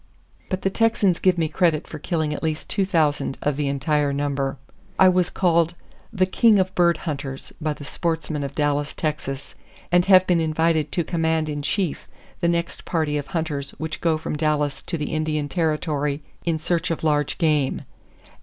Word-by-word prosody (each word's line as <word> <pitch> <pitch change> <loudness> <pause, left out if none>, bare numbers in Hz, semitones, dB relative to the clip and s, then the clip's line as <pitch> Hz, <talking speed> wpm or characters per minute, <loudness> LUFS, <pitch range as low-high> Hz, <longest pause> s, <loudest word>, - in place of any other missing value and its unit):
But 185 -1 -3
the 195 - +1
Texans 210 -5 +2
give 185 -2 +3
me 165 -2 +1
credit 160 -1 +1
for 155 - -8
killing 155 -1 -1
at - - -5
least 155 -1 -2
2,000 160 -9 +1
of 145 -1 +1
the 145 0 -1
entire 145 +1 +1
number. 140 -1 -1 0.4
I 190 - +7
was 180 -1 +2
called 170 -2 +2 0.4
'the 190 -4 +2
king 215 +3 +4
of 190 0 +1
bird 170 -3 +3
hunters' 140 -4 -4
by 155 -1 0
the 145 - -11
sportsmen 160 -2 -2
of 140 0 -5
Dallas, 145 -1 0
Texas, 145 -3 -3 0.4
and 175 0 +4
have 185 -1 +7
been 175 -2 +2
invited 160 -1 +1
to 175 - +1
command 160 -2 0
in 145 -1 -3
chief 175 +2 -1 0.3
the 170 - +1
next 170 0 -1
party 155 -3 -1
of 145 -1 -2
hunters 155 -4 -3
which 160 0 -5
go 165 -2 +2
from 155 - -4
Dallas 150 -2 0
to 170 - -4
the 150 0 -3
Indian 155 -1 -1
Territory 150 -3 -1 0.2
in 165 -2 +1
search 165 +2 -1
of 165 - -3
large 150 -2 +1
game. 150 -5 +1
155 Hz, 180 wpm, -23 LUFS, 145-170 Hz, 0.4 s, I